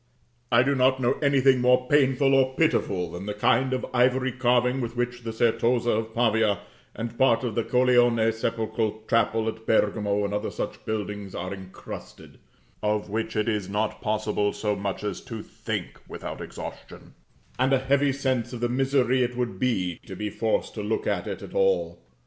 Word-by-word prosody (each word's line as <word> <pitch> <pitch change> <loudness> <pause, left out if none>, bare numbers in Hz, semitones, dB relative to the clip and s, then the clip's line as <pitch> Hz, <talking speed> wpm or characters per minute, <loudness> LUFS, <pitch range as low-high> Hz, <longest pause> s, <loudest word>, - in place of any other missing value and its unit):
I 120 +1 +6
do 140 +2 +2
not 130 0 +3
know 125 -1 +2
anything 135 -3 +4
more 125 0 +3
painful 135 -1 +3
or 130 -1 +3
pitiful 100 - +1
than 90 +3 -7
the 105 - -3
kind 130 +5 +2
of 130 -1 -1
ivory 130 +1 +3
carving 125 +1 +2
with 120 0 -4
which 120 0 -2
the 115 -1 -4
Certosa 120 +1 +2
of 110 +1 -2
Pavia, 110 -4 +2 0.3
and 115 +1 -5
part 120 -2 +4
of 120 -3 -2
the 115 - 0
Colleone 120 -3 +3
sepulchral 110 -1 -2
chapel 115 -1 +2
at 110 0 -5
Bergamo, 105 -1 +2
and 100 - -3
other 105 +1 -1
such - - -5
buildings, 105 -2 -4
are 90 +2 -4
incrusted, 95 -1 -10 0.4
of 105 -1 -1
which 110 +1 -2
it 110 +1 0
is 105 -4 -1
not 105 +2 -2
possible 105 -1 0
so 105 -1 -1
much 100 0 -4
as 105 - -3
to 115 -3 -7
think - - -5
without - - -7
exhaustion; - - -9 0.5
and 130 +1 +2
a 135 - +5
heavy 140 +2 +2
sense 130 -3 -1
of 120 - -5
the 120 - +1
misery 130 0 +2
it 125 0 -1
would 120 -7 -2
be, 95 -9 0
to - - -7
be 105 -1 -4
forced - - -1
to - - -5
look 425 0 -2
at - - -1
it - - -5
at - - -10
all. 485 0 +1
115 Hz, 185 wpm, -26 LUFS, 105-130 Hz, 0.5 s, I